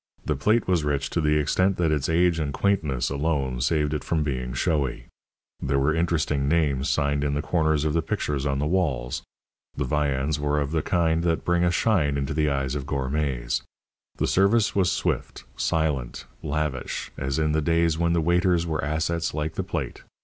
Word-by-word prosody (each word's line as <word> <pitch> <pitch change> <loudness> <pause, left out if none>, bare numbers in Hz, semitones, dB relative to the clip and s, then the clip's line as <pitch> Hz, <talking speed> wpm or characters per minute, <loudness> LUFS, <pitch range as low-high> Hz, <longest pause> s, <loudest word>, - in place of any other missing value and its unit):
The 75 - 0
plate 105 - +2
was 90 -4 +2
rich 70 -1 -1
to 85 - 0
the 75 0 +2
extent 95 +6 +1
that 85 -3 +1
its 75 -1 0
age 85 0 +3
and 75 -2 -1
quaintness 75 -9 0
alone 70 -4 -1
saved 75 +3 +1
it 75 - -2
from 80 -2 0
being 65 -4 -3
showy; 65 -2 -1 0.6
there 70 0 0
were 70 +3 +2
interesting 80 -4 0
names 75 -3 +1
signed 70 -1 +1
in 70 0 0
the 75 - 0
corners 80 -3 +1
of 75 - +1
the 85 - +2
pictures 75 -3 -2
on 70 0 0
the 70 - -1
walls; 75 -8 0 0.6
the 70 - 0
viands 70 +1 0
were 75 0 +1
of 70 0 -2
the 80 -1 +1
kind 80 0 +1
that 85 -1 0
bring 85 0 +2
a 90 - +3
shine 85 -6 +2
into 70 +1 -2
the 75 0 +1
eyes 70 -1 -1
of 70 -2 -4
gourmets. 65 -3 -1 0.6
The - - +1
service 100 +4 +3
was 95 -3 +3
swift, - - -2
silent, 75 -8 -1 0.2
lavish, 75 -3 -3
as 70 0 -2
in 80 -1 +1
the 80 +1 +1
days 85 0 +2
when 85 0 +2
the 85 - +2
waiters 85 +1 +2
were 80 -3 -2
assets 80 +2 -1
like 80 +1 -2
the - - -2
plate. - - -4
75 Hz, 195 wpm, -25 LUFS, 70-85 Hz, 0.6 s, age